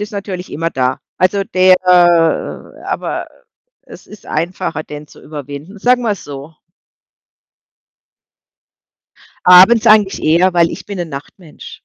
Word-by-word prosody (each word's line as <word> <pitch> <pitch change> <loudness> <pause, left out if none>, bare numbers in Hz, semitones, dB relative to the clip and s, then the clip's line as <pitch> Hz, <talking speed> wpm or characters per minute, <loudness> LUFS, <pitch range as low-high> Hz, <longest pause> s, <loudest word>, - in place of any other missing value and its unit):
ist 210 - -5
natürlich 190 -3 -6
immer 165 +2 -3
da. 130 -2 -1 0.2
Also, 195 +2 0
der 185 0 +4 1.1
aber - - -4 0.5
es - - -15
ist 210 -2 -15
einfacher, 165 -1 -3
den 150 0 -10
zu - - -18
überwinden. 145 +5 -9
Sagen 245 +4 +2
wir's 210 -4 -3
so. 145 +2 -10 2.9
Abends 185 +6 +7
eigentlich 210 -2 +3
eher, 170 +4 +2
weil 170 -1 +2
ich - - -9
bin 200 - -7
'nen 175 -2 -4
Nachtmensch. 150 +4 -11
180 Hz, 120 wpm, -15 LUFS, 155-200 Hz, 2.9 s, Abends